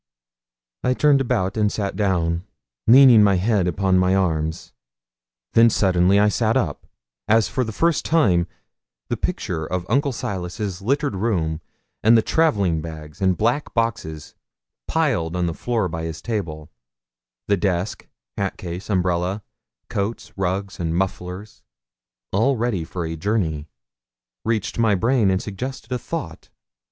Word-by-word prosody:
I 125 0 +2
turned 145 -1 +4
about 95 -6 0
and 105 -1 +2
sat 100 -3 -3
down, 90 -4 0 0.4
leaning 125 -2 +8
my 100 -2 +4
head 95 0 +1
upon 95 +1 +2
my 90 +1 +3
arms. 80 -7 -1 0.8
Then 115 0 +7
suddenly 95 -2 +3
I 105 - +5
sat 105 - +1
up, - - -2 0.4
as 110 -1 +4
for 130 +8 -1
the 110 - -4
first 165 +9 +1
time 95 - +3 0.6
the - - 0
picture 80 - -3
of 90 +2 -3
Uncle 140 +5 +2
Silas's 95 -3 -4
littered 140 +2 0
room, 85 -7 -1 0.4
and 115 +2 +6
the 110 - +3
travelling 100 - +2
bags 80 +1 -9
and 95 -2 +2
black 120 +7 0
boxes 100 -10 -2 0.5
plied 120 - 0
on 90 -1 0
the 85 - -1
floor 115 +1 -1
by 80 -1 -5
his 80 -1 -5
table 80 -10 -4 0.8
the 100 - +3
desk, 95 0 -2 0.3
hat 100 -1 -2
case, 90 +2 -7
umbrella, 90 +1 0 0.4
coats, 100 +4 -4
rugs, 95 +1 -2
and 80 -1 -1
mufflers, 95 +2 -4 0.7
all 120 +8 +2
ready 110 -7 -1
for 85 +1 -5
a 80 0 -4
journey 80 -5 -1 0.8
reached 110 -1 -1
my 110 -3 +4
brain 115 +1 +2
and 95 0 0
suggested 125 +5 -5
thought. - - -6
95 Hz, 140 wpm, -22 LUFS, 90-115 Hz, 0.8 s, leaning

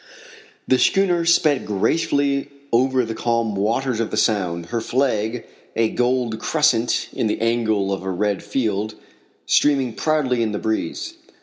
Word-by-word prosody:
The 130 - +3
schooner 180 -3 +2
sped 155 -5 +3
gracefully 140 +6 0 0.2
over 130 +1 +3
the 115 - -4
calm 115 -2 -1
waters 115 +5 0
of 115 - -1
the - - -4
sound, 90 -7 0
her 120 -1 -1
flag 120 -2 -1 0.3
a 115 -1 +2
gold 125 -2 0
crescent 125 -6 +1
in - - -1
the 105 - -1
angle 110 -4 +1
of 95 - -4
a 95 - -4
red 100 +2 -1
field 105 -1 -2 0.5
streaming 135 -5 +2
proudly 140 -6 0
in 110 -2 0
the - - -1
breeze. 110 -6 -3
115 Hz, 145 wpm, -21 LUFS, 105-135 Hz, 0.5 s, The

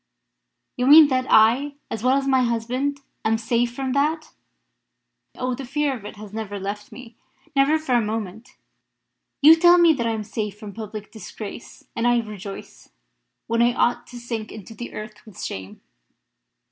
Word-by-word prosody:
You 250 0 0
mean 300 +1 +9
that 255 -1 0
I, 245 +7 +4 0.2
as 225 - -4
well 260 +2 +3
as 275 0 -2
my 265 -1 +3
husband, 250 +4 -1 0.2
am 220 0 +2
safe 235 +1 0
from 265 0 -3
that. 300 +4 -1 1.0
Oh! 255 0 -2
the 265 +3 -6
fear 280 +1 -1
of 215 -5 -11
it - - -8
has 210 -1 -11
never 210 -2 -5
left 205 +2 -6
me 235 -2 -12 0.4
never 275 +3 +4
for 310 -5 -3
one 235 -3 +2
moment. 220 0 -5 0.9
You 315 +2 +10
tell 345 +2 +6
me 340 -2 +6
that 235 -5 -2
I 225 - 0
am 220 -1 -3
safe 210 -1 -5
from 210 -2 -9
public 215 -1 -8
disgrace, 220 0 -10
and 230 +1 0
I 240 0 +4
rejoice 210 -3 -7 0.6
when 230 +1 0
I 240 +1 +3
ought 240 - +1
to 245 - -10
sink 230 -2 -5
into 215 +1 -10
the 240 +2 -8
earth 215 0 -9
with 215 -5 -14
shame!" 95 0 -7
235 Hz, 175 wpm, -23 LUFS, 215-265 Hz, 1.0 s, You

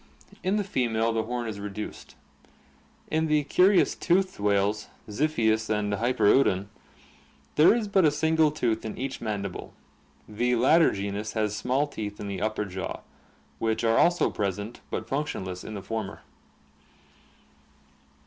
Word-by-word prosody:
In 190 +2 +1
the 210 - +1
female 115 - 0
the 115 - +1
horn 120 0 -3
is 105 -2 -5
reduced. 105 +1 -7 1.0
In 160 +1 +1
the 150 -1 +2
curious 185 +6 +4
toothed 185 - +1
whales, 105 +1 +1 0.2
Ziphius 110 -3 +1
and 105 -1 0
Hyperoddon, 105 -3 +2 0.8
there 155 +8 +6
is 230 -3 -1
but 195 -2 +3
a 155 - +6
single 160 +1 +2
tooth 120 -7 -1
in 110 - -6
each 130 0 -4
mandible. 100 -4 -4 0.5
The 120 +4 0
latter 155 +8 +5
genus 100 +2 -4
has 105 -2 -1
small 130 +6 +1
teeth 105 -8 -6
in 105 - -5
the 100 -2 -4
upper 110 -1 -1
jaw, 95 -1 -5 0.6
which 110 0 0
are 115 0 +3
also 175 +1 +3
present 100 +2 -3
but - - -3
f - - -23
unctioniess 95 -11 -3
in 110 - -7
the 100 - -6
former. 110 -3 -5
115 Hz, 145 wpm, -27 LUFS, 105-150 Hz, 1.0 s, there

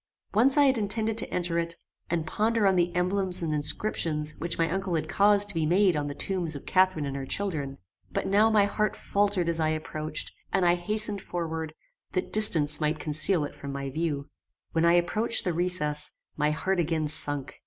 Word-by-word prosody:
Once 255 +7 +3
I 290 - +6
had 260 -3 +2
intended 215 +1 -1
to - - +2
enter 175 -1 -1
it, 170 0 -3 0.3
and 165 -2 -1
ponder 220 +2 0
on 190 -1 +3
the 175 -1 +1
emblems 185 0 0
and 160 -2 -2
inscriptions 150 -1 -1
which 170 +2 -4
my 165 - +1
uncle 190 0 -2
had 155 -1 -2
caused 205 +3 +4
to - - -5
be 160 -2 -1
made 185 +1 +3
on 145 -1 -2
the 145 - -6
tombs 175 -4 -1
of 140 - -9
Catharine 185 -5 +2
and 140 -1 -5
her 135 -1 -6
children; 155 -9 -3 0.3
but - - -3
now 210 +3 +3
my 210 -2 +3
heart 210 0 -1
faltered 200 -3 0
as 165 -1 -1
I 155 -1 +1
approached, 155 0 -4 0.2
and 185 - +1
I 175 - +4
hastened 210 +3 -1
forward, 160 -3 -5 0.4
that 185 - -3
distance 160 -8 +6
might 155 +1 0
conceal 155 +3 +3
it - - -8
from 140 - -8
my 140 -1 -5
view. 145 -2 -3 0.4
When 165 0 +1
I 170 - +4
approached 210 +7 +2
the 180 - -1
recess, 160 -4 -1 0.3
my 150 0 0
heart 180 +5 -1
again 160 -2 -1
sunk. 145 -2 0
170 Hz, 200 wpm, -26 LUFS, 155-200 Hz, 0.4 s, I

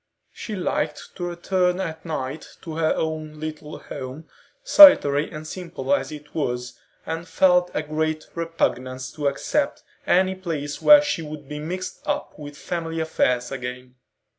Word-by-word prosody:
She 215 - -6
liked 155 -5 -3
to 175 - -3
return 180 +1 0
at 160 -4 -4
night 150 -2 -5
to 165 - -6
her 160 -1 +2
own 155 -1 -3
little 155 -1 -6
home, 130 +5 -8 0.4
solitary 280 - +8
and 155 0 -8
simple 180 - -3
as 280 - 0
it 150 -1 -10
was, 125 -5 -3 0.3
and 165 +2 -4
felt 180 -1 +4
a 155 - 0
great 155 +1 -2
repugnance 130 -6 -2
to 145 -2 -2
accept 140 - -1 0.2
any 185 +1 +3
place 160 -6 -4
where 295 -1 +8
she 285 - -1
would 150 -2 -8
be 150 +1 -6
mixed 180 +4 -5
up - - -2
with 145 -1 -9
family 165 -1 -4
affairs 125 -6 0
again. 125 -1 -6
155 Hz, 150 wpm, -23 LUFS, 145-175 Hz, 0.4 s, solitary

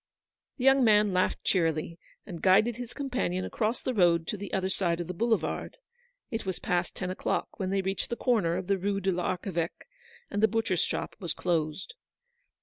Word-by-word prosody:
The 250 - -4
young 270 0 +6
man 210 -3 +5
laughed 185 0 +1
cheerily, 165 -2 0 0.3
and 175 -5 -8
guided 210 +5 +4
his 245 -1 -6
companion 245 -9 -2
across 220 +2 -1
the 255 - -1
road 170 -5 +4
to - - -1
the 205 0 -7
other 190 -1 0
side 175 -3 0
of 175 - -2
the 180 - -5
boulevard. 225 +5 -1 0.5
It 225 -1 -2
was 190 -2 -3
past 175 0 -1
ten 180 0 -3
o'clock 185 - -2
when 190 -2 -1
they 195 0 0
reached 190 0 -2
the 235 - -1
corner 210 -10 +1
of 185 - -4
the 195 +1 +1
Rue 200 +1 0
de 190 0 +1
l'Arche 180 +2 -2
veque, 170 0 -3 0.5
and 205 - -1
the 220 - +6
butcher's 220 -6 0
shop - - -2
was 175 -4 -3
closed. 160 -1 -1
190 Hz, 195 wpm, -29 LUFS, 175-220 Hz, 0.5 s, young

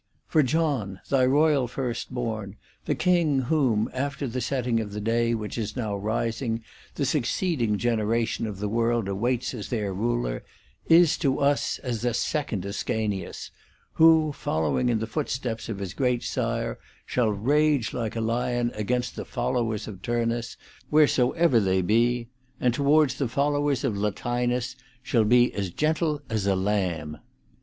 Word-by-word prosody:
For 155 - +3
John, 130 - 0
thy 130 -2 +3
royal 145 -1 +3
first 125 -1 -4
born, 110 -5 -4 0.3
the - - 0
king, 170 -7 +2
whom, 125 -6 +1
after 140 +2 -2
the 125 +1 -3
setting 125 -2 0
of 105 -2 -5
the 105 - -3
day 115 +2 +1
which 110 +1 -4
is 110 -1 -3
now 110 -5 -2
rising, 115 +3 -2 0.3
the 140 - 0
succeeding 135 - 0
generation 115 0 0
of 105 -3 -6
the 105 +1 -2
world 115 0 +1
awaits 120 +7 -1
as 110 -5 -6
their 105 -5 -2
ruler, 115 - -1 0.4
is 165 -1 +5
to 135 -4 +1
us 140 0 +1
as 120 -4 -3
a 120 -1 +1
second 120 -8 -1
Ascanius, 100 0 -3 0.4
who, 160 -1 +5
following 80 - 0
in 115 - +2
the 110 - -2
foot 140 +6 -3
steps 120 -3 -3
of 110 - -3
his 95 -2 -5
great 125 -2 0
sire, 115 -2 -2 0.3
shall 120 -3 +1
rage 140 +4 +2
like 115 -3 -3
a 115 - -1
lion 120 +1 0
against 120 +3 -2
the - - -4
followers 115 -4 -2
of 100 -4 -8
Turnus 115 0 -1 0.3
wheresoever 150 -1 +4
they 95 -2 +1
be, 115 +4 +2 0.3
and 125 -1 +2
towards 145 +1 +3
the 135 - +1
followers 145 +1 0
of 125 -7 0
Latinus 120 +5 -1 0.3
shall 115 -3 +2
be 120 +2 +4
as 100 -2 -2
gentle 155 - 0
as 110 -4 -1
a 100 - +3
lamb. 90 -6 -1
120 Hz, 155 wpm, -26 LUFS, 110-135 Hz, 0.4 s, is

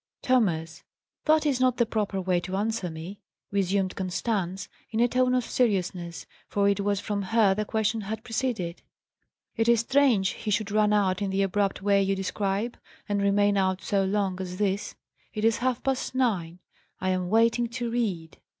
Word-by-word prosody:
"Thomas, 175 -11 +1 0.4
that 310 0 +4
is 275 -4 +1
not 255 -1 +2
the 235 - +3
proper 210 -3 -2
way 185 -1 +1
to 185 +2 -5
answer 210 -2 -1
me," 165 +5 -8 0.3
resumed 195 -1 0
Constance, 190 0 -2 0.2
in 220 - -2
a 240 - +5
tone 255 +1 +2
of 250 -2 +1
seriousness, 180 -8 -1 0.2
for 200 -1 +1
it 200 0 +2
was 200 0 0
from 205 0 -2
her 205 0 +3
the 215 +2 -2
question 220 +1 0
had 220 +2 -5
proceeded. 225 -8 -2 0.7
"It 225 0 +1
is 235 -2 +5
strange 245 -7 +3
he 215 - -5
should 210 0 0
run 210 0 +3
out 195 -3 +2
in 200 - 0
the 195 +1 +1
abrupt 195 0 0
way 200 -1 +4
you 195 0 +1
describe, 195 +4 -2 0.3
and 205 -1 0
remain 200 0 +3
out 190 -1 0
so 200 -1 +1
long 190 -1 -1
as 180 -1 -5
this. 200 0 -1 0.4
It 215 +1 -1
is 225 0 +3
half 255 0 -1
past 265 -1 -1
nine! 180 -9 0 0.4
I 185 - -1
am 185 -1 -1
waiting 230 +2 +3
to 235 0 -4
read." 190 -10 -2
205 Hz, 180 wpm, -27 LUFS, 190-230 Hz, 0.7 s, a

